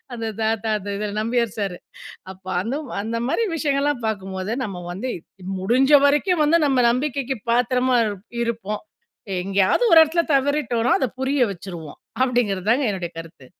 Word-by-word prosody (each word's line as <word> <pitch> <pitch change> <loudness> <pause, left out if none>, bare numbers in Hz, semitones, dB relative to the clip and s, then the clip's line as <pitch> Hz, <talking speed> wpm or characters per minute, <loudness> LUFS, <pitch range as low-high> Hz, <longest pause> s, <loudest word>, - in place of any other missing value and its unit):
அந்த 230 -1 -5 0.2
தாத்தா, 220 0 0
அந்த 205 +1 -7
இதுல 205 0 -3
நம்பியார் 230 -1 -1
சாரு. 195 -4 -3 0.5
அப்போ 190 0 -12
அந்த 230 +8 -3 0.3
அந்த 225 +2 -3
மாரி 460 - +1
விஷயங்கள்லாம் 285 -4 0
பார்க்கும்போது, 190 -1 -4
நம்ம 200 -6 -5
வந்து 205 +9 -4 0.3
இ, - - -12 0.2
முடிஞ்ச 250 +9 +2
வரைக்கும் 300 +4 +3
வந்து 305 +3 +4
நம்ம 270 -3 +2
நம்பிக்கைக்கு 265 +1 -1
பாத்திரமா 250 +2 +2
இரு 210 -1 -2 0.3
இருப்போம். 225 -3 -3 0.6
எங்கேயாவது 195 - +2
ஒரு 330 - +9
இடத்துல 330 +2 0
தவறிட்டோம்னா, 265 -4 +1
அதை 260 - 0
புரிய 265 -1 +2
வச்சுருவோம். 170 -4 -9 0.2
அப்பிடீங்கிறது 220 -7 0
தாங்க 260 +4 +3
என்னுடைய 180 -3 -4
கருத்து. 165 -4 -10
235 Hz, 150 wpm, -22 LUFS, 195-270 Hz, 0.6 s, ஒரு